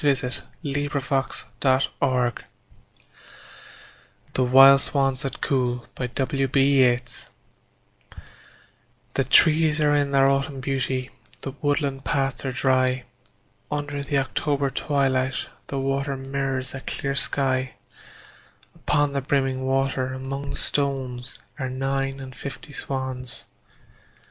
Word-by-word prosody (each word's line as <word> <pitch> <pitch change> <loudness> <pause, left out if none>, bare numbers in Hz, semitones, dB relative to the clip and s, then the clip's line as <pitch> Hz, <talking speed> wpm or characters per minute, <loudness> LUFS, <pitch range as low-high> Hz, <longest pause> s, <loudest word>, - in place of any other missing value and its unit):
William 130 -3 +2 0.6
Butler 140 -1 0
Yeats - - -3 0.2
The 130 -2 +1 2.0
Wild 135 +2 +8
Swans 135 -1 0
at 135 - -4
Coole 125 -3 0
THE 135 -1 +1 2.0
trees 155 0 +5
are 150 -1 +3
in 145 -1 +2
their 135 -1 +4
autumn 140 0 0
beauty, 130 -1 -2 0.3
The 135 - -3
woodland 145 -2 0
paths 135 -2 -1
are 135 - -1
dry, 130 0 +2 0.7
Under 145 -1 -3
the 140 0 0
October 140 +1 0
twilight 135 -3 0 0.2
the 140 - -4
water 135 +1 -1
Mirrors 135 -1 -3
a 135 - -5
still 140 +1 -3
sky; 130 -2 +1 1.0
Upon 145 -1 +1
the 140 - 0
brimming 135 -1 0
water 135 -1 0
among 135 +2 -5
the - - -4
stones 135 -3 -1 0.2
Are 130 -1 -2
nine 135 +1 -2
and 130 -1 -9
fifty 140 +4 -7
Swans. 130 -2 -4
135 Hz, 105 wpm, -24 LUFS, 130-140 Hz, 2.0 s, Wild